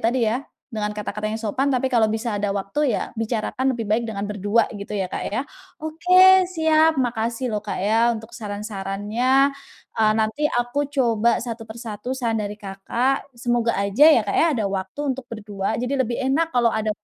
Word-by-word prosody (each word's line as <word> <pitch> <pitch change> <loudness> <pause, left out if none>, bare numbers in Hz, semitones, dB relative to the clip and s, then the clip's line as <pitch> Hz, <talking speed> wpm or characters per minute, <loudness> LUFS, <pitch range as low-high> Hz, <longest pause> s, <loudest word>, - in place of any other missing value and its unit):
tadi 240 +3 +2
ya, 235 - 0 0.4
dengan 210 -1 -1
kata-kata 210 0 -4
yang 220 - -3
sopan, 255 +6 -1
tapi 260 0 +1
kalau 230 -4 +2
bisa 220 0 -2
ada 205 0 -1
waktu 205 +6 0
ya - - -6
bicarakan 230 +3 -1
lebih 225 - -3
baik 220 +3 +1
dengan 200 -1 -4
berdua 205 +2 +1
gitu 200 0 -8
ya 200 -3 -1
Kak - - -5
ya? 215 - -1 0.4
Oke, 365 +4 +5
siap. 320 -3 +3
Makasih 235 0 -1
loh 215 -3 -2
Kak 210 - -4
ya 225 +5 +3
untuk 220 -1 -6
saran-sarannya. 210 +5 0 0.4
Eee, 215 -1 +3
nanti 220 +7 -1
aku 245 +4 -1
coba 235 -5 +2
satu 230 -1 -5
per 220 +1 -10
satu 230 +1 -6
saran 235 -4 -1
dari 205 0 -5
Kakak. 230 +8 -2
Semoga 240 -1 +1
aja 200 +6 +1 0.2
ya 215 - -3
Kak 200 - -2
ya - - +4
ada 235 -8 -1
waktu 195 +9 -3
untuk 265 - -8
berdua. 210 -1 -3
Jadi 250 +3 -2
lebih 245 -3 -1
enak 280 +5 +1
kalau 240 -5 +2
ada 220 0 0
230 Hz, 185 wpm, -22 LUFS, 210-260 Hz, 0.4 s, Oke